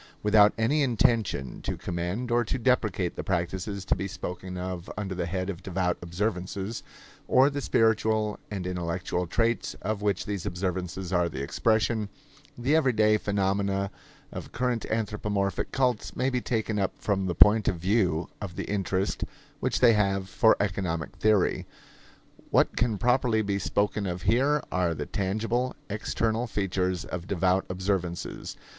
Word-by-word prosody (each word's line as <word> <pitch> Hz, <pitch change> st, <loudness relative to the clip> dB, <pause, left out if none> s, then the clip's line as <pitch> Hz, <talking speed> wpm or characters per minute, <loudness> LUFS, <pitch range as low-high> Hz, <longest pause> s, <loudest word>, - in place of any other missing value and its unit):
Without 105 Hz, 0 st, +6 dB
any 115 Hz, +7 st, +2 dB
intention 115 Hz, -, +1 dB
to -, -, -3 dB
commend 90 Hz, +8 st, -3 dB
or 120 Hz, 0 st, +3 dB
to 120 Hz, -, -2 dB
deprecate 110 Hz, -8 st, +1 dB
the -, -, -4 dB
practices 95 Hz, +2 st, -2 dB
to -, -, +2 dB
be 95 Hz, +2 st, -3 dB
spoken 90 Hz, -1 st, -6 dB
of 90 Hz, 0 st, -5 dB
under 100 Hz, -2 st, -3 dB
the 90 Hz, -2 st, -2 dB
head 90 Hz, +1 st, -2 dB
of 95 Hz, -2 st, -5 dB
devout 90 Hz, -1 st, 0 dB
observances, 95 Hz, +3 st, -3 dB, 0.5 s
or 135 Hz, +3 st, +5 dB
the 140 Hz, 0 st, -3 dB
spiritual 110 Hz, -3 st, +2 dB
and 95 Hz, -4 st, -4 dB
intellectual 90 Hz, 0 st, -2 dB
traits 115 Hz, +6 st, 0 dB
of 105 Hz, +1 st, -2 dB
which 100 Hz, -3 st, 0 dB
these 100 Hz, -3 st, -3 dB
observances 90 Hz, 0 st, -3 dB
are 90 Hz, -1 st, +2 dB
the 70 Hz, -4 st, -5 dB
expression, 110 Hz, +5 st, +1 dB, 0.5 s
the 130 Hz, +5 st, +2 dB
everyday 110 Hz, -8 st, +4 dB
phenomena 100 Hz, -1 st, 0 dB, 0.4 s
of -, -, -7 dB
current 125 Hz, -2 st, -1 dB
anthropomorphic 105 Hz, -3 st, -1 dB
cults 125 Hz, -4 st, 0 dB
may 130 Hz, +1 st, +1 dB
be 125 Hz, -1 st, 0 dB
taken 110 Hz, -3 st, -1 dB
up 95 Hz, -, 0 dB
from 95 Hz, -2 st, 0 dB
the 90 Hz, -, -1 dB
point 105 Hz, +4 st, +6 dB
of -, -, +2 dB
view 90 Hz, -2 st, +1 dB
of 95 Hz, -4 st, -5 dB
the -, -, -3 dB
interest 95 Hz, -1 st, -1 dB, 0.4 s
which -, -, -1 dB
they 120 Hz, -2 st, +7 dB
have 100 Hz, -2 st, +1 dB
for 110 Hz, +3 st, +4 dB
economic 90 Hz, -5 st, -1 dB
theory. 105 Hz, -3 st, +2 dB, 0.8 s
What -, -, +3 dB
can 115 Hz, -3 st, +1 dB
properly 120 Hz, 0 st, +2 dB
be 100 Hz, -1 st, -1 dB
spoken 100 Hz, +2 st, 0 dB
of 90 Hz, 0 st, -4 dB
here 135 Hz, +8 st, +3 dB
are 90 Hz, -2 st, +1 dB
the 75 Hz, -, -4 dB
tangible, 115 Hz, -, -1 dB, 0.2 s
external 110 Hz, +3 st, -1 dB
features 95 Hz, -4 st, -1 dB
of 90 Hz, +1 st, -6 dB
devout 95 Hz, 0 st, +1 dB
observances. 90 Hz, -2 st, -3 dB
100 Hz, 150 wpm, -27 LUFS, 90-110 Hz, 0.8 s, they